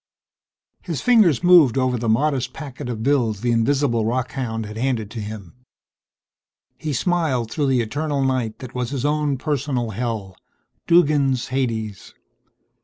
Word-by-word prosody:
His 165 -6 -4
fingers 215 - +4
moved 170 -9 +6
over 130 -1 +1
the 115 -1 -2
modest 135 +3 +1
packet 140 -3 -7
of 110 -2 -4
bills 120 -7 +1
the 120 - +1
invisible 120 0 +1
rockhound 120 -1 -2
had 105 +1 -8
handed 115 -3 -2
to 115 - -6
him. 105 -4 -7 1.3
He 155 - -3
smiled 140 -6 0
through 145 0 0
the 130 -2 +2
eternal 145 +4 -2
night 130 -4 -1
that 130 -1 -10
was 125 -2 -2
his 140 -1 -3
own 150 -2 0
personal 135 -4 -2
hell. 105 -4 -4 0.5
Duggan's 145 -7 +3
Hades. 115 -7 -3
130 Hz, 140 wpm, -22 LUFS, 115-145 Hz, 1.3 s, moved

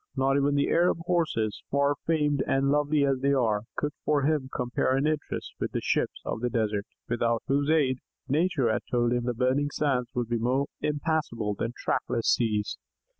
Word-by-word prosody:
Not 135 0 +2
even 140 0 +2
the 140 - +2
Arab 175 0 +3
Horses, 155 - 0
far 140 +1 +2
famed 150 -4 +2
and 135 +1 +2
lovely 145 0 +2
as 135 -2 +1
they 140 +1 +2
were, 110 -5 +2
could 150 - -1
for 145 -2 +2
him 145 -2 +1
compare 125 +1 0
in 135 - +1
interest 155 -1 -2
with - - -3
the - - 0
"ships - - -1
of - - -3
the 125 - 0
desert," 110 -3 -1 0.2
without 115 -1 0
whose 140 +2 +1
aid, 140 -5 +3 0.3
Nature 145 -4 +2
had - - -1
told 120 -1 +2
him 120 -1 -1
the 125 -1 -1
burning 130 +4 +1
sands 135 -5 0
would 120 -2 -1
be 120 0 -1
more 130 +4 +1 0.2
impassable 150 -8 -1
than 115 +4 -3
tractless 115 -2 0
seas. 105 -3 0
135 Hz, 185 wpm, -27 LUFS, 120-145 Hz, 0.3 s, Arab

